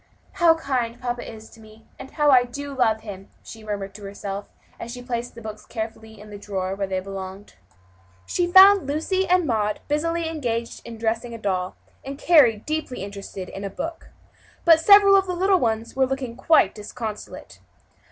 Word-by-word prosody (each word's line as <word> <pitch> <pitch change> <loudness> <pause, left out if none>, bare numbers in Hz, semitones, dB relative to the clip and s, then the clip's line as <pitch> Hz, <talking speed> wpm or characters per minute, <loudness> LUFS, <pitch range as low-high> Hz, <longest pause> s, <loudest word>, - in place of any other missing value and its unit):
"How 340 -3 +4
kind 250 -6 -2
papa 245 -1 -4
is 220 -1 -12
to 230 - -16
me, 220 0 -17
and 265 - -9
how 295 -1 +2
I 250 -2 +6
do 280 +3 -7
love 220 -4 +2
him!" 195 -3 -9
she 225 -1 -11
murmured 200 -2 -5
to 205 +1 -12
herself 200 0 -6 0.3
as 235 - -7
she 250 - -7
placed 240 -1 -4
the 230 - -11
books 215 -1 -8
carefully 220 -1 -7
in 210 0 -13
the 205 - -8
drawer 190 -2 -3
where 195 0 -3
they 190 -1 -2
belonged. 195 +1 -8 0.7
She 350 - -1
found 385 -3 +8
Lucy 350 +6 -1
and 360 -1 +3
Mary 215 -5 0
busily 330 +3 -1
engaged 235 -8 -3
in 230 -1 -8
dressing 230 +1 -2
a - - -6
doll, 185 -4 -2 0.3
and 275 +1 -7
Carry 290 -9 +5
deeply 305 -2 -4
interested 195 -2 -8
in 195 - -8
a 200 - -3
book. 325 - -7 0.6
But 330 -2 +7
several 400 +3 +7
of 385 -1 +3
the 360 - -2
little 380 +1 +3
ones 225 -1 -2
were 265 0 +2
looking 260 -3 -4
quite 255 -6 +3
disconsolate. 210 0 -8
230 Hz, 185 wpm, -23 LUFS, 210-300 Hz, 0.7 s, found